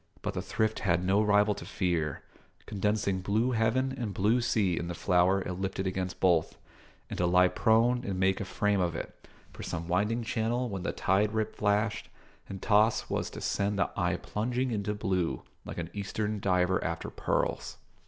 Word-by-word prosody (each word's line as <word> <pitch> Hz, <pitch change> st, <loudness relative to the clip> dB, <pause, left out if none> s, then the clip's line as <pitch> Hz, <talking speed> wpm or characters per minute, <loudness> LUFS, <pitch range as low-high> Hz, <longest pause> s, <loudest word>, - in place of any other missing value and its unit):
But -, -, -2 dB
the -, -, -2 dB
thrift 110 Hz, 0 st, -1 dB
had 90 Hz, -2 st, +1 dB
no 100 Hz, +3 st, +3 dB
rival 105 Hz, 0 st, +4 dB
to -, -, -8 dB
fear, 85 Hz, -6 st, -1 dB, 0.4 s
condensing 105 Hz, -1 st, 0 dB
blue 110 Hz, +6 st, +1 dB
heaven 125 Hz, +3 st, +1 dB
and 115 Hz, -7 st, -4 dB
blue 110 Hz, +6 st, +2 dB
sea 105 Hz, -6 st, +1 dB
in 85 Hz, -, -3 dB
the 85 Hz, -, -4 dB
flower 90 Hz, +1 st, +2 dB
it 90 Hz, -, -4 dB
lifted 95 Hz, 0 st, -2 dB
against 95 Hz, -1 st, -3 dB
both; 85 Hz, -4 st, +2 dB, 0.5 s
and -, -, -4 dB
to 90 Hz, -, +2 dB
lie 90 Hz, +1 st, +5 dB
prone 120 Hz, +5 st, +3 dB
and 95 Hz, -5 st, -3 dB
make 95 Hz, +1 st, +2 dB
a -, -, -3 dB
frame 100 Hz, +1 st, +1 dB
of 85 Hz, -2 st, 0 dB
it -, -, -5 dB, 0.4 s
for -, -, -9 dB
some 85 Hz, 0 st, -4 dB
winding 105 Hz, +6 st, +1 dB
channel 115 Hz, +2 st, -1 dB
when 95 Hz, -3 st, -4 dB
the -, -, -2 dB
tide 100 Hz, +3 st, +1 dB
rip 110 Hz, 0 st, -1 dB
flashed 105 Hz, +1 st, 0 dB, 0.4 s
and 95 Hz, -1 st, -7 dB
tossed 110 Hz, +1 st, +3 dB
was -, -, -1 dB
to -, -, -9 dB
send 100 Hz, 0 st, 0 dB
the -, -, +1 dB
eye 90 Hz, 0 st, +1 dB
plunging 125 Hz, +6 st, -2 dB
into 105 Hz, -1 st, -2 dB
blue 90 Hz, -, -1 dB, 0.2 s
like -, -, -7 dB
an 85 Hz, -1 st, -4 dB
Eastern 105 Hz, +1 st, -3 dB
diver 95 Hz, -1 st, +1 dB
after -, -, -3 dB
pearls. -, -, -2 dB
100 Hz, 185 wpm, -29 LUFS, 90-110 Hz, 0.5 s, lie